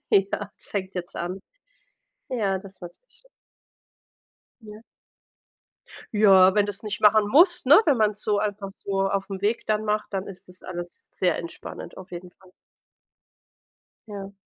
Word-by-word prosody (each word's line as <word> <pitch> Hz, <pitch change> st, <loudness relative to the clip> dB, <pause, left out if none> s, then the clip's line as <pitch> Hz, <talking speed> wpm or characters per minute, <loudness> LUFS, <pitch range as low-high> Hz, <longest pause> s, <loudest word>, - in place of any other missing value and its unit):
Ja. 200 Hz, +1 st, +1 dB
fängt 190 Hz, -2 st, -5 dB
jetzt 175 Hz, -1 st, -6 dB
an. 180 Hz, +3 st, -4 dB, 0.9 s
Ja, 205 Hz, -7 st, 0 dB
das 195 Hz, -1 st, -14 dB
natürlich 175 Hz, -, -14 dB, 1.4 s
Ja. 210 Hz, 0 st, -12 dB, 1.3 s
Ja, 190 Hz, -2 st, +6 dB
wenn 205 Hz, -, +4 dB
du's 205 Hz, -1 st, -5 dB
nicht 210 Hz, -2 st, -5 dB
machen 210 Hz, 0 st, +5 dB
musst, 340 Hz, -, +4 dB
ne? 295 Hz, +11 st, +8 dB
Wenn 285 Hz, -4 st, +4 dB
man's 210 Hz, -2 st, +1 dB
so 205 Hz, -1 st, 0 dB
einfach 205 Hz, -1 st, -3 dB, 0.2 s
so 195 Hz, -1 st, 0 dB
aufm 195 Hz, -1 st, -3 dB
Weg 215 Hz, +3 st, 0 dB
dann 215 Hz, 0 st, 0 dB
macht, 210 Hz, 0 st, -2 dB
dann 195 Hz, 0 st, -3 dB
ist 190 Hz, -2 st, -11 dB
das 180 Hz, 0 st, -16 dB
alles 175 Hz, -1 st, -8 dB
sehr 180 Hz, -3 st, 0 dB
entspannend, 170 Hz, 0 st, -8 dB
auf 190 Hz, -, -11 dB
jeden 175 Hz, 0 st, -9 dB
Fall. 185 Hz, 0 st, -22 dB, 1.6 s
Ja. 200 Hz, -2 st, -8 dB
200 Hz, 140 wpm, -25 LUFS, 190-210 Hz, 1.6 s, ne